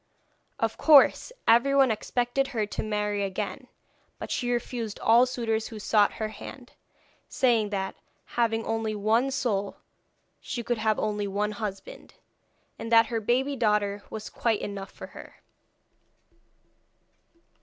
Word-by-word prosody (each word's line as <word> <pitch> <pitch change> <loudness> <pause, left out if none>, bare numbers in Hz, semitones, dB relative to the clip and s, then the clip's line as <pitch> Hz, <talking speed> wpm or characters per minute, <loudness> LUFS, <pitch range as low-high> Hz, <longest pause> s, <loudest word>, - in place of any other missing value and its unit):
Of 225 0 -1
course 300 - +6 0.2
everyone 265 +2 +5
expected 245 +5 -1
her 215 - +2
to 205 - -4
marry 210 -1 -1
again, 195 -1 -4 0.5
but - - -7
she 245 - -1
refused 240 -2 -3
all 235 +3 +5
suitors 225 -3 -2
who 225 - -9
sought 210 0 +3
her 215 -1 -3
hand, 245 +4 -11 0.6
saying 230 -5 +2
that, 190 -2 -3 0.4
having 225 -1 +1
only 225 -1 -2
one 220 +6 +2
soul 220 -7 -1 0.6
she 240 - -5
could 240 0 -1
have 215 -1 +1
only 210 -1 -1
one 205 +2 -1
husband, 205 -2 -7 0.6
and 225 +1 -6
that 230 0 +7
her 225 - 0
baby 260 +6 +1
daughter 210 -4 +1
was 220 -1 -7
quite 225 -3 0
enough 200 -1 -5
for - - -10
her. - - -12
225 Hz, 135 wpm, -27 LUFS, 210-240 Hz, 0.6 s, that